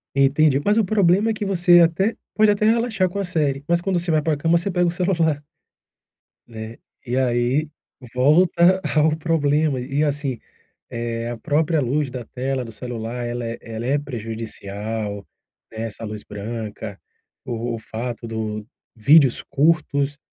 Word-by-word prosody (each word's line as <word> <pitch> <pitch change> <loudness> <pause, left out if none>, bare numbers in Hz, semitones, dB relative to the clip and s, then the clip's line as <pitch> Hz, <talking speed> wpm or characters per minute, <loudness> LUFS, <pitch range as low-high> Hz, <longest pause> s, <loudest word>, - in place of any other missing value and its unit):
Entendi. 140 +1 +4
Mas 210 +2 +2
o 225 - +3
problema 200 +2 +3
é - - 0
que 210 - -5
você 175 -2 +5
até 175 +6 +3 0.2
pode 215 -1 +5
até 205 +1 +1
relaxar 220 -4 +2
com 180 - -7
a - - 0
série, 150 -6 0
mas 170 0 +2
quando 185 -1 0
você 175 0 -1
vai 155 -1 +3
pra 155 -1 0
cama 165 +4 +3
você 175 +4 -1
pega 175 -1 +1
o - - +1
celular. 170 -5 0 1.0
Né? 110 -1 -8 0.3
E 125 - -2
aí 130 +4 +1 0.4
volta 170 +7 +4
ao 155 0 +4
problema. 150 -3 +1
E 135 +4 -1
assim, 140 -4 -1 0.5
eh, 115 0 -3
a 120 - -4
própria 155 +4 +1
luz 140 +2 0
da 125 -1 -6
tela 130 +2 -3
do 115 - -9
celular 120 +1 -5
ela 120 0 -3
é 115 0 -4
ela 115 +1 -6
é 140 +3 +2
prejudicial, 110 -4 -5 0.4
né. 110 0 -6
Essa 115 0 -8
luz 105 -1 -6
branca, 105 -1 -6 0.4
o 120 0 -3
o - - -4
fato 115 +2 -6
do 110 -2 -4 0.3
vídeos 135 +3 +5
curtos, 145 -1 +1
140 Hz, 160 wpm, -22 LUFS, 115-170 Hz, 1.0 s, você